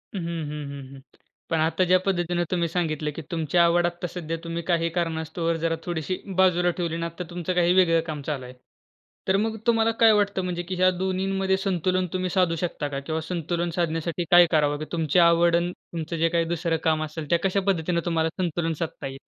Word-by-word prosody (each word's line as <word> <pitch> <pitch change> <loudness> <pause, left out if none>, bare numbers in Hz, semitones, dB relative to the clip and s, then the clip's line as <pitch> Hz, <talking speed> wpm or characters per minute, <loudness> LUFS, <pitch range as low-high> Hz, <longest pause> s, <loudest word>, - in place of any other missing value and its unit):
हं, 190 - -2
हं, 155 -3 -4
हं, 140 0 -7
हं. - - -11 0.5
पण 165 - +1
आता 160 +4 +2
ज्या 185 0 +5
पद्धतीनं 175 -2 0
तुम्ही 170 -2 +1
सांगितलं, 155 -3 -1
की - - -5
तुमची 165 -1 -1
आवड 170 0 +4
आत्ता 175 +1 -3
सध्या 165 -2 -5
तुम्ही 165 0 -4
काही 165 -1 +1
कारणास्तव 165 0 -1
जरा 165 0 +1
थोडीशी 175 +1 -2 0.2
बाजूला 180 -2 +4
ठेवली, 170 -2 -2
ना 165 - -2
आता 170 +2 -5
तुमचं 175 0 -3
काही 175 0 +3
वेगळं 170 -3 +4
काम 150 -3 -4
चालू 145 -4 -2
आहे. 125 - -10 0.7
तर 190 +1 +3
मग 220 +2 -1
तुम्हाला 225 -1 +3
काय 225 -1 +7
वाटतं? 205 -2 +1
म्हणजे 175 -1 -3
की 185 +2 -5
या 185 - +6
दोन्हींमध्ये 190 +1 0
संतुलन 185 -1 0
तुम्ही 185 0 -1
साधू 180 -2 +2
शकता 165 -3 -3
का? 140 -1 -4
किंवा 160 +3 -3
संतुलन 170 +1 -2
साधण्यासाठी 170 0 -1
काय 175 0 +9
करावं? 145 -2 +2
की 155 - -4
तुमची 165 0 +1
आवड 170 0 +5
अन् 175 +1 +1
तुमचं 165 -1 -6
जे 165 +1 +2
काही 170 0 +1
दुसरं 170 0 -1
काम 155 -1 +2
असेल, 155 -1 -6
त्या 170 - +3
कशा 195 +1 +2
पद्धतीनं 170 -2 +1
तुम्हाला 165 -2 +1
संतुलन 165 -1 -1
साधता 160 -4 -4
येईल? 135 0 -8
170 Hz, 205 wpm, -25 LUFS, 160-180 Hz, 0.7 s, काय